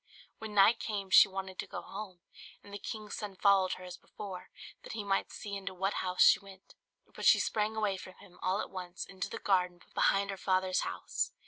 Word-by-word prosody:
When 220 -1 -7
night 210 +4 +6
came 200 -3 -4
she - - +9
wanted 190 -1 -6
to - - -3
go - - -6
home; 195 -3 -8 0.4
and 200 - -13
the 205 - -5
king's 215 +1 -6
son 205 -3 -6
followed 195 -1 +4
her 185 - -8
as 180 -1 -8
before, 195 -3 -9 0.3
that - - -8
he 220 -2 -4
might 195 -1 0
see 205 -2 -6
into 195 -1 -5
what 195 +2 0
house 180 0 +3
she - - +7
went; 195 -2 -15 0.4
but - - -8
she - - +7
sprang 215 0 0
away 210 -3 0
from 185 0 -10
him, 180 - -17
all 190 +3 +1
at - - -7
once, 180 -1 -6
into 190 -1 -5
the - - -5
garden 180 -2 +1
behind 200 0 +2
her 195 - -6
father's 185 -1 +1
house. 90 0 -2
195 Hz, 215 wpm, -32 LUFS, 185-205 Hz, 0.4 s, she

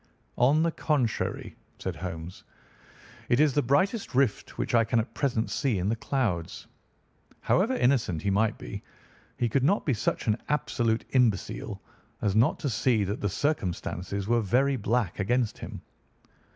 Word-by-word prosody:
"On 140 +6 +4
the 165 - +2
contrary," 140 -9 -1 0.2
said - - -4
Holmes, 85 -1 -7 0.9
"it 120 - +3
is 150 -2 +4
the 145 - +3
brightest 165 - +1
rift 130 -5 +1
which - - -2
I 115 -1 +5
can 115 +1 +1
at 115 - -3
present 120 -5 -1
see 135 -8 0
in 95 +2 0
the 115 - +1
clouds. 110 -9 -2 0.8
However 225 +8 +2
innocent 120 - +1
he 100 - +1
might 110 +2 +1
be, - - -7 0.6
he 120 - +1
could 130 +3 +1
not 195 +9 +2
be 140 - +2
such 110 - -1
an 110 +1 +1
absolute 120 -6 0
imbecile 120 -8 0 0.4
as 100 -2 0
not 115 +3 +4
to - - -1
see 110 0 +2
that 100 +2 -3
the 105 - 0
circumstances 95 - -2
were 120 0 +3
very 130 +7 +2
black 110 -4 -1
against 120 +3 0
him. - - -8
115 Hz, 160 wpm, -28 LUFS, 100-140 Hz, 0.9 s, I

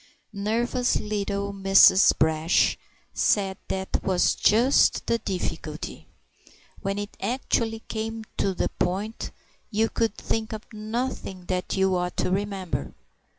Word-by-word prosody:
Nervous 235 +5 0
little 200 -1 -2
Mrs. 195 0 +6
Brash 160 +2 +3 0.4
said 195 -2 +2
that 190 0 -2
was 185 -2 +2
just 240 +6 +4
the 230 - +1
difficulty; 190 -4 -5 0.7
when 195 0 -2
it 205 +1 -5
actually 230 -3 -1
came 225 0 -4
to 195 -1 0
the - - 0
point 200 +5 -2 0.4
you 220 +1 +1
could 225 -2 0
think 225 0 -2
of 215 0 -6
nothing 215 -4 -4
that 185 +1 -2
you 190 -1 +3
ought 180 0 -2
to - - 0
remember. 190 - -3
205 Hz, 120 wpm, -25 LUFS, 190-225 Hz, 0.7 s, Mrs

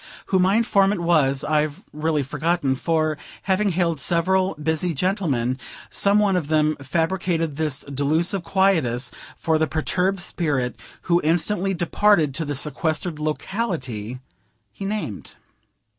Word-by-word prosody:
Who 190 - +5
my 185 +2 +3
informant 200 -4 +3
was 145 -6 +2
I've 150 0 0
really 150 -1 0
forgotten; 150 0 0
for, 155 +1 0 0.2
having 200 +2 +2
hailed 170 -4 0
several 185 +5 +1
busy 160 +3 -1
gentlemen, 140 - 0 0.3
some 200 +1 +3
one 205 -2 +3
of 170 -5 -1
them 155 0 +2
fabricated 165 +1 -1
this 150 -2 -1
delusive 155 +7 0
quietus 160 -12 +2 0.3
for 160 -1 +1
the 160 - +2
perturbed 180 +5 0
spirit, 140 -9 -1 0.3
who 175 0 +2
instantly 175 +4 +1
departed 175 -3 +3
to 160 +4 -2
the 145 0 -3
sequestered 155 +3 -2
locality 150 - -3 0.5
he 195 - -7
named. 195 - -4
160 Hz, 130 wpm, -23 LUFS, 145-185 Hz, 0.5 s, Who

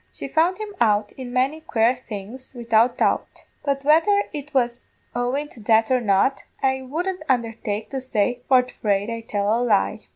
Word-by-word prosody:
She - - -7
found 340 +4 +2
him 430 -1 -6
out 210 -2 +3
in 255 -2 -8
many 265 +5 0
quare 235 -4 +2
things, 245 +2 -9
widout 235 0 +2
doubt; - - -1 0.2
but 280 -1 -1
whether 370 +7 +4
it 295 -1 -6
was 245 -2 0 0.3
owin' 250 +5 -1
to - - -15
that 220 +2 +3
or 255 -1 +3
not, 205 +5 +2 0.2
I 265 0 +1
wouldn't 345 +8 -3
undertake 225 -4 -1
to 270 -1 -3
say 245 -1 0
for 255 -1 +5
fraid 205 -2 -1
I'd 230 0 -7
tell 205 +1 +1
a 235 - 0
lie. 220 -2 +1
245 Hz, 175 wpm, -23 LUFS, 220-275 Hz, 0.3 s, for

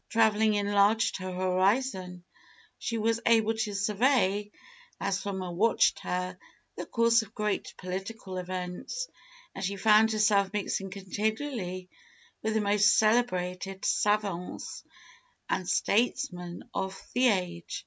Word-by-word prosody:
Travelling 220 -1 +3
enlarged 205 +2 +2
her 185 -1 -5
horizon: 185 0 0 0.6
she 230 - -2
was 225 +1 +1
able 225 -1 +4
to 220 -2 -3
survey, 205 0 +2 0.5
as 195 -1 -1
from 190 -1 -4
a 180 - -5
watch 215 +7 +3
tower, 180 0 -4 0.4
the - - -6
course 230 -1 +3
of 220 0 -12
great 210 -1 -2
political 190 +1 -6
events, 180 - -5 0.5
and 195 - -6
she 195 +1 -1
found 215 +2 +5
herself 200 -2 +3
mixing 195 -1 -2
continually 200 0 -3 0.5
with 220 0 -1
the 220 - +2
most 210 +1 +4
celebrated 195 -4 +1
savants 205 -4 -1 0.6
and 180 -2 -2
statesmen 190 -6 0
of 190 0 -3
the 250 +1 +4
age. 180 -5 -1
200 Hz, 120 wpm, -29 LUFS, 185-220 Hz, 0.6 s, found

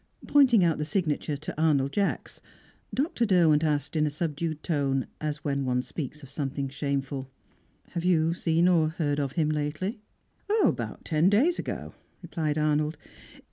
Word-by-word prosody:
Pointing 255 -8 +5
out 165 -3 +2
the - - 0
signature 155 -4 -1
to 150 +1 -6
Arnold 140 -4 +3
Jacks, 200 +3 -2 0.5
Dr. 275 -3 0
Derwent 170 -7 +4
asked 150 -1 0
in 155 -1 +2
a - - +1
subdued 155 0 -3
tone, 140 -5 0 0.2
as 150 -1 -3
when 140 -2 -1
one 125 -1 0
speaks 150 +1 -6
of 135 - -12
something 140 -1 -3
shameful: 135 -1 -3 0.6
"Have 170 - -3
you 165 -2 +3
seen 170 0 +2
or 165 -4 +4
heard 150 -3 -1
of 140 -2 -2
him 155 -2 +1
lately?" 155 +9 -2 0.6
"About - - -1
ten 160 +2 +3
days 275 - +3
ago," - - -5 0.3
replied 160 -3 -2
Arnold. 150 0 +1
155 Hz, 155 wpm, -27 LUFS, 145-170 Hz, 0.6 s, Pointing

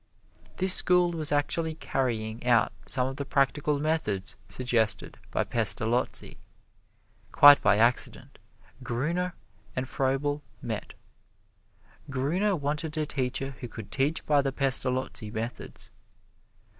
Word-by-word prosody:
This 190 0 +4
school 180 -1 +4
was 155 -3 -2
actually 160 +2 0
carrying 115 -6 -3
out 120 -3 +3 0.2
some 125 -2 +2
of 135 +1 -5
the 140 - -3
practical 140 +2 0
methods 140 -11 -1
suggested 115 -5 -1
by - - 0
Pestalozzi. 115 +3 +1 0.9
Quite 145 0 +8
by 105 0 +3
accident 120 +3 +1 0.4
Gruner 170 +9 -2 0.4
and 130 0 -2
Froebel 140 +2 -1 0.2
met. - - -6 1.1
Gruner 165 +10 0
wanted 150 +1 -2
a 155 - 0
teacher 135 -1 -2
who 125 - -6
could 110 -3 -10
teach 140 +6 0
by 145 -2 +3
the 135 -1 -2
Pestalozzi 130 -4 +1
methods. 115 +2 -6
135 Hz, 115 wpm, -27 LUFS, 125-150 Hz, 1.1 s, Quite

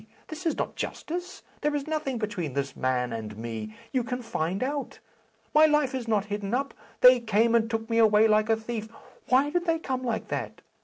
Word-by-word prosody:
This 320 +2 -4
is 325 - 0
not - - -3
justice. 355 +3 -5 0.2
There 295 0 +1
is 285 -1 -2
nothing 305 -5 -2
between 185 - -3
this 140 0 -2
man 125 -2 0
and 110 -2 -6
me. 110 -1 -6 0.2
You 255 -2 +1
can 250 +1 -4
find 185 0 -2
out. 280 +1 -3 0.6
My 310 +1 +7
life 300 -3 +2
is 255 -3 -3
not 215 -3 +1
hidden 205 +1 -2
up. 275 +2 -2 0.3
They 250 0 +9
came 225 0 +2
and 230 -1 +3
took 225 -1 -2
me 230 0 +1
away 220 -1 +6
like 215 0 +3
a 225 - +5
thief. 220 0 -5 0.4
Why 270 +3 +4
did 350 +1 0
they 330 -1 +2
come 260 -5 -3
like 235 -3 -2
that? - - -4
230 Hz, 205 wpm, -27 LUFS, 205-275 Hz, 0.6 s, They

